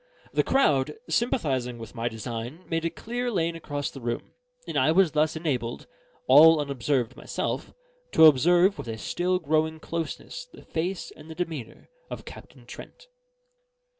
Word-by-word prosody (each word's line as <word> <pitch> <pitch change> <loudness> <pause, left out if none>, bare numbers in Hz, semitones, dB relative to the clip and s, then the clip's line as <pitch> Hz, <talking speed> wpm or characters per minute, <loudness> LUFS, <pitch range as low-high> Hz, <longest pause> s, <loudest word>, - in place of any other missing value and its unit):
The - - +4
crowd, 150 - +2
sympathising 135 - 0
with 115 -2 -9
my 120 -1 -2
design, 120 - -6
made 165 0 -1
a - - +2
clear 245 +7 -4
lane 170 -6 0
across 145 -3 -4
the 135 - -10
room; 120 0 -4 0.3
and - - -5
I 155 - +4
was 180 -1 +4
thus 155 +1 +1
enabled, 130 -8 -2 0.4
all 155 +4 +8
unobserved 140 -3 -1
myself, - - -3 0.4
to 160 - +8
observe 175 +7 +5
with - - -6
a 110 -1 -4
still 180 - 0
growing 160 -1 0
closeness 170 - -5
the - - -14
face 175 +3 -3
and 155 +1 -14
the 160 - -8
demeanour 160 -9 -5 0.2
of - - -7
Captain - - -12
Trent. - - -12
155 Hz, 155 wpm, -26 LUFS, 130-170 Hz, 0.4 s, all